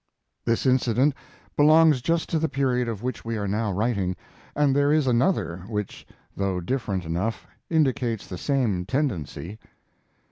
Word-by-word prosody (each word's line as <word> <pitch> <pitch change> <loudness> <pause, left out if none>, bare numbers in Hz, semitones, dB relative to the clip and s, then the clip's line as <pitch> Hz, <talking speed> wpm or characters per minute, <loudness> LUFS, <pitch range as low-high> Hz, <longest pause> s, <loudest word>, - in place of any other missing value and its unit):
] - - -53
This 115 +2 +1
incident 130 +2 +3 0.4
belongs 155 -2 +5
just 165 +4 0
to 160 - +1
the 160 0 0
period 125 -3 0
of 115 -2 -4
which 125 0 -3
we 115 -1 -3
are 100 -1 -2
now 105 +1 -1
writing, 100 -2 0 0.4
and 145 -2 +3
there 145 0 +3
is 155 -2 +3
another 120 - +1
which, 105 -3 -5 0.3
though 95 -2 -1
different 95 -2 -2
enough, 90 +8 -2 0.2
indicates 130 -8 +1
the 90 - -7
same 120 -11 0
tendency. 110 - -2
120 Hz, 150 wpm, -25 LUFS, 100-140 Hz, 0.4 s, belongs